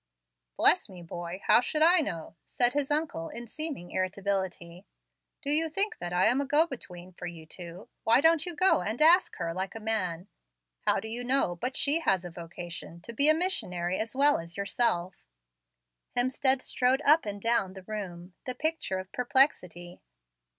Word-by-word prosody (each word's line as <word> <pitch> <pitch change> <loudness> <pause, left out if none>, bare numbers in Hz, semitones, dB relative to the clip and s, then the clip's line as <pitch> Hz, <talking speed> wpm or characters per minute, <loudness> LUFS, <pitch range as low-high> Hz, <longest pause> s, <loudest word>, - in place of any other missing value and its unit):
"Bless - - +3
me, 180 -2 -12
boy! 175 +2 -7
how - - +6
should 310 +4 0
I 350 +2 +6
know?" 170 - -4
said 245 0 +2
his 285 -1 0
uncle, 295 - -1
in 235 - -7
seeming 275 - -5
irritability. 185 -1 -3 0.6
"Do 285 - +2
you 320 +2 +5
think 395 +7 +1
that 175 0 -5
I 180 +1 +2
am 260 +3 +3
a - - -2
go 295 +3 +4
between 185 - -9
for 180 - -8
you 165 -2 -9
two? 175 +3 -10 0.2
Why 230 +3 +4
don't 320 +1 +4
you 350 -1 -3
go 370 - +3
and 215 +6 -4
ask 335 +4 +5
her, 165 0 -4
like 190 +4 -5
a - - -6
man? 190 -5 -1 0.6
How - - +3
do 220 - -6
you 235 +2 -3
know 250 -8 +1
but 250 +9 -4
she 290 +3 +4
has 190 - 0
a 175 - -7
vocation 170 0 -9
to 235 - -9
be 280 +6 +7
a 310 - +6
missionary 185 - -1
as 225 +3 -4
well 285 +2 +3
as 170 +2 -11
yourself?" 195 -3 0 1.0
Hemstead 260 +1 +1
strode 260 +3 +1
up 305 -4 +5
and 205 0 -5
down 200 -4 0
the 190 -1 -11
room, 185 -4 -7
the 255 - -2
picture 310 -9 -2
of 185 0 -8
perplexity. 240 - 0
215 Hz, 185 wpm, -28 LUFS, 175-280 Hz, 1.0 s, be